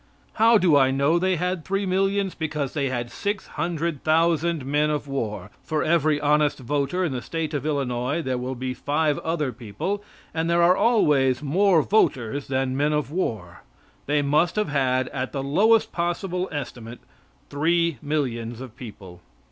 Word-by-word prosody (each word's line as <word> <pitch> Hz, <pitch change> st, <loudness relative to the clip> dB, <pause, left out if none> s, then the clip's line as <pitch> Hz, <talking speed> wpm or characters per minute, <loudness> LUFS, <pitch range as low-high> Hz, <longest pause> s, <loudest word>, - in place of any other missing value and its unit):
How 225 Hz, +1 st, +5 dB
do 180 Hz, -6 st, +4 dB
I 135 Hz, -2 st, +5 dB
know 140 Hz, +5 st, +2 dB
they 185 Hz, +1 st, +1 dB
had 180 Hz, 0 st, -2 dB
three 195 Hz, +3 st, -1 dB
millions? 195 Hz, +1 st, 0 dB
Because 150 Hz, -4 st, -3 dB
they 140 Hz, -3 st, -1 dB
had 120 Hz, -2 st, -3 dB
six 205 Hz, -, -3 dB
hundred 165 Hz, -3 st, -3 dB
thousand 165 Hz, -1 st, +2 dB
men 150 Hz, +2 st, +1 dB
of 150 Hz, -1 st, -2 dB
war. 105 Hz, -8 st, -4 dB
For 155 Hz, -1 st, -1 dB
every 155 Hz, -2 st, +2 dB
honest 150 Hz, 0 st, +2 dB
voter 140 Hz, +7 st, -1 dB
in 160 Hz, -, -2 dB
the 125 Hz, -2 st, -3 dB
State 160 Hz, +2 st, -4 dB
of 145 Hz, 0 st, -2 dB
Illinois 140 Hz, +1 st, -1 dB
there 130 Hz, -2 st, -2 dB
will 130 Hz, +1 st, -4 dB
be 130 Hz, +1 st, -3 dB
five 145 Hz, +3 st, 0 dB
other 155 Hz, -5 st, -2 dB
people, 125 Hz, -, -4 dB, 0.3 s
and 165 Hz, +1 st, -1 dB
there 170 Hz, 0 st, +3 dB
are 180 Hz, +2 st, +5 dB
always 145 Hz, -, +3 dB
more 175 Hz, +2 st, +3 dB
voters 140 Hz, -, +1 dB
than 130 Hz, -1 st, -1 dB
men 145 Hz, +2 st, +1 dB
of 150 Hz, -1 st, -1 dB
war. 110 Hz, -, -3 dB, 0.5 s
They 145 Hz, 0 st, +2 dB
must 155 Hz, +4 st, +2 dB
have 210 Hz, -6 st, 0 dB
had 130 Hz, -3 st, +1 dB
at 130 Hz, -1 st, -4 dB
the 135 Hz, -2 st, -2 dB
lowest 210 Hz, +11 st, +3 dB
possible 180 Hz, +1 st, -2 dB
estimate 120 Hz, -5 st, -6 dB, 0.5 s
three 165 Hz, 0 st, +1 dB
millions 120 Hz, -6 st, -2 dB
of 125 Hz, -3 st, -9 dB
people. 100 Hz, -8 st, -11 dB
150 Hz, 170 wpm, -24 LUFS, 130-170 Hz, 0.5 s, How